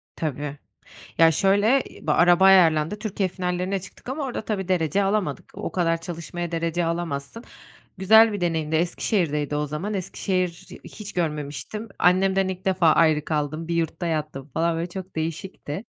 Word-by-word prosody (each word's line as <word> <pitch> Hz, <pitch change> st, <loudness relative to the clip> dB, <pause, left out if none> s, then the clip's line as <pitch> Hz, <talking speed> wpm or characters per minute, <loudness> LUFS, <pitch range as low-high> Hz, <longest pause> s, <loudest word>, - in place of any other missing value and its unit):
Tabii. 145 Hz, -1 st, -4 dB, 0.6 s
Ya, 165 Hz, 0 st, +7 dB
şöyle, 205 Hz, -, +3 dB, 0.2 s
araba 175 Hz, +2 st, +4 dB
ayarlandı: 170 Hz, -1 st, +5 dB
Türkiye 205 Hz, -3 st, -2 dB
finallerine 180 Hz, +1 st, -2 dB
çıktık 190 Hz, +6 st, -14 dB
ama 280 Hz, +2 st, -3 dB
orada 245 Hz, -4 st, -4 dB
tabii, 190 Hz, -4 st, -3 dB
derece 180 Hz, +2 st, +1 dB
alamadık. 195 Hz, -7 st, -1 dB
O -, -, -5 dB
kadar 165 Hz, -2 st, +1 dB
çalışmaya 170 Hz, 0 st, -6 dB
derece 170 Hz, +1 st, -1 dB
alamazsın. 165 Hz, -, -4 dB, 0.5 s
Güzel 220 Hz, +3 st, +6 dB
bir 205 Hz, -, -4 dB
deneyimdi, 160 Hz, -2 st, 0 dB
Eskişehir'deydi 155 Hz, -, 0 dB
o 150 Hz, -, -1 dB
zaman. 165 Hz, +9 st, -4 dB
Eskişehir'i 185 Hz, -2 st, -3 dB
hiç 210 Hz, -1 st, -9 dB
görmemiştim. 150 Hz, -, -4 dB
Annemden 190 Hz, +1 st, +3 dB
ilk 185 Hz, 0 st, -6 dB
defa 185 Hz, -4 st, +4 dB
ayrı 155 Hz, -2 st, +3 dB
kaldım. 155 Hz, +1 st, -2 dB
Bir 170 Hz, -, -1 dB
yurtta 170 Hz, +1 st, -1 dB
yattım 150 Hz, -3 st, -3 dB
falan, 165 Hz, +4 st, 0 dB
böyle, 170 Hz, +2 st, -3 dB
çok 185 Hz, 0 st, -8 dB
değişikti. 165 Hz, +3 st, -5 dB
175 Hz, 145 wpm, -24 LUFS, 160-195 Hz, 0.6 s, Ya